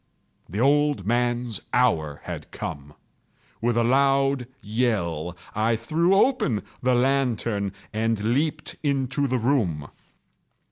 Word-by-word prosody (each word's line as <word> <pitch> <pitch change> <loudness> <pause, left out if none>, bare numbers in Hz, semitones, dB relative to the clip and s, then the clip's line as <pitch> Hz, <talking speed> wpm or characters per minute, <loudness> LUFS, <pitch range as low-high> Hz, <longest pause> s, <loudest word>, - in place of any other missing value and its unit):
The 100 +6 -4
old 145 -4 +3
man's 120 -1 0
hour 80 -13 +1
had - - -7
come! 70 +1 -7 0.7
With 120 0 +1
a 120 - +3
loud 135 0 +2
yell, 100 - -1 0.2
I 110 +2 +1
threw 160 - +1
open 200 - +2 0.2
the 125 0 +2
lantern 120 -6 +1 0.2
and 110 0 0
leaped 155 +3 -1
into 140 -1 0
the 130 0 0
room. 110 - 0
120 Hz, 110 wpm, -25 LUFS, 105-135 Hz, 0.7 s, old